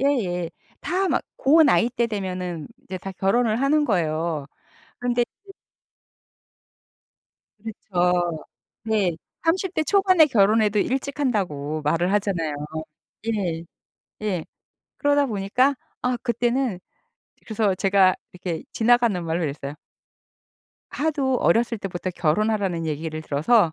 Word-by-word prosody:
예예. 190 -12 0 0.3
다 370 +5 0
막 - - +1
고 315 +4 +5
나이 260 -4 +4
때 240 -1 0
되면은 185 -6 -4 0.2
이제 190 -8 -6
다 195 - -6
결혼을 215 +4 +1
하는 295 +2 +3
거예요. 160 - 0 0.5
근데 245 -1 +1 0.2
이제 390 - -12 2.1
그렇죠. 180 -6 -1 0.4
네. 205 -6 +1 0.3
30 365 +2 +1
대 - - +2
초반에 370 -2 +5
결혼해도 215 -3 +3
일찍 270 +6 -1
한다고 155 - -1
말을 165 +5 +1
하잖아요. 180 -7 0 0.8
예. 170 -5 -2 0.6
예. 190 -6 -1 0.5
그러다 285 0 +3
보니까 245 +5 +1 0.3
아 250 0 0
그때는 240 -4 0 0.7
그래서 215 -3 +1
제가 190 0 +4 0.2
이렇게 175 -2 -4
지나가는 235 -5 +3
말로 165 +1 -1
이랬어요. 140 -1 -4 1.2
"하도 280 -4 0
어렸을 230 -1 +2
때부터 185 -2 -4
결혼하라는 180 0 0
얘기를 155 +1 -3
들어서 160 +5 +3
205 Hz, 250 characters per minute, -24 LUFS, 175-245 Hz, 2.1 s, 고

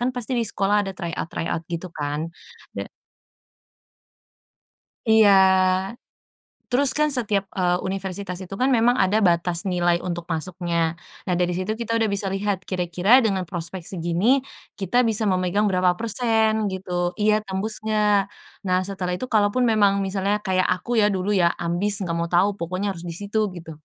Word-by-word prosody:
Kan 250 +1 -1
pasti 245 +1 -4
di 235 -2 +1
sekolah 200 +1 +1
ada - - -4
try 170 -1 -5
out - - -4
try - - -4
out 165 - -2
gitu 170 +1 -5
kan. 150 +1 -3 0.5
Ya - - -6 2.2
Iya, 220 -2 +6 1.4
terus 255 +1 +4
kan 300 0 +3
setiap, 210 -7 0
eee, 180 -1 +2
universitas 190 -1 -4
itu 185 +2 -8
kan 260 - +3
memang 245 0 +3
ada 195 +3 +3
batas 170 0 +1
nilai 175 -2 +1
untuk 175 -2 -4
masuknya. 170 0 -2 0.3
Nah 180 - +1
dari 180 0 +1
situ 185 +4 -2
kita 230 0 -1
udah 225 - +2
bisa 200 0 -1
lihat, 195 0 -2
kira-kira 180 +6 +2
dengan 195 -4 0
prospek 175 0 -5
segini, 180 +10 +1 0.4
kita 200 +5 +2
bisa 220 -1 +2
memegang 185 +2 +1
berapa 180 -2 +1
persen 220 -2 +1
gitu. 180 -2 -2
Iya 215 0 +2
tembus 195 +3 -2
nggak. 210 -1 +2 0.5
Nah 185 0 +2
setelah 190 -2 -3
itu, 255 - -4
kalaupun 215 +1 +2
memang 205 -3 +3
misalnya 195 +2 0
kayak 185 -1 +2
aku 205 +6 -1
ya, - - +5
dulu 185 +2 -2
ya, 175 -3 +3
ambis 175 +4 +1
nggak 165 -1 -2
mau 170 0 -2
tau, 190 +3 +3
pokoknya 185 +4 -3
harus 170 - -9
di 170 - -5
situ, 205 +4 -3 0.2
gitu. 165 -2 -9
190 Hz, 165 wpm, -23 LUFS, 175-215 Hz, 2.2 s, Iya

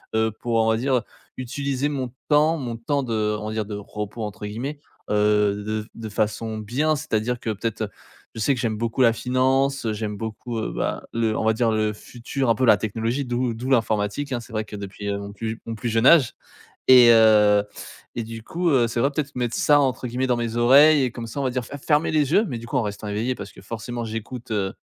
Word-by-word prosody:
heu, 110 0 +2
pour, 120 -1 -2
on 110 0 +3
va 110 - +2
dire, 130 +3 +1
heu, 125 - +2 0.4
utiliser 140 +2 -2
mon 130 -4 -3 0.2
temps 155 +2 +4
mon 120 -5 -4
temps 140 +5 -1
de 110 -3 -1
on 105 - -5
va 110 - -4
dire, 110 -1 -2
de 105 0 -6
«repos» 105 +2 -6
entre 105 0 -6
guillemets, 130 +8 -5 0.3
heu, 105 -1 +2
de 110 0 -2
f - - -17
de 110 -1 -7
façon 110 +2 -2
bien. 145 +9 0
C'est-à-dire 125 -5 -2
que 115 - -3
peut-être, 110 +2 -3
heu, 105 - -3 0.5
je - - -6
sais 140 - +3
que 125 - -6
j'aime 110 -3 -1
beaucoup 115 +3 -1
la 115 -2 +5
finance, 130 +2 +1
heu, 110 - 0
j'aime 105 -1 -4
beaucoup, 115 +2 -5
heu, 110 - -3
bah, - - -2
le 115 -1 0
on - - -1
va 110 - +4
dire, 115 0 +1
le 110 -1 0
futur, 120 +4 -4
un 115 - +4
peu 130 - +1
la 110 - +6
technologie 115 +6 -2
d'où 120 0 -1
d'où 125 +4 -5
l'informatique 110 +3 0
hein. 120 - -1
C'est 115 - -14
vrai 110 0 -2
que 105 - -9
depuis, 100 0 -7
heu, 100 - -1
mon 100 0 -8
plus 110 +2 -4
j - - -4
mon 115 - -4
plus 115 +2 -3
jeune 115 +1 +1
âge 150 -8 +6 0.5
et, 125 -2 +9
heu, 105 -2 +6 0.5
et 120 - -2
du 115 0 -8
coup, 170 +7 -1
heu, 120 -4 +4
c'est 115 +1 -3
vrai, 140 +3 +2
peut-être 140 -1 -3
mettre 120 -2 -2
«ça» 145 -1 +4
entre 130 -2 -1
guillemets 125 +2 -1
dans 125 -1 +1
mes 115 -1 -3
oreilles 140 +5 +6
et 125 - 0
comme 120 -1 -7
ça, 115 - -6
on - - -1
va 130 - +1
dire, 125 -1 -3
f - - -15
f 140 - -18
fermer 150 0 +2
les 150 -3 +1
yeux, 215 - +4
mais 125 -5 -4
du 115 - -10
coup 125 - -1
en - - +3
restant 105 0 -5
éveillé 115 +5 -1
parce - - -8
que - - -14
forcément 115 +3 -5
j'écoute, 115 +2 -6
heu, 100 -3 -1
115 Hz, 255 wpm, -23 LUFS, 110-130 Hz, 0.5 s, et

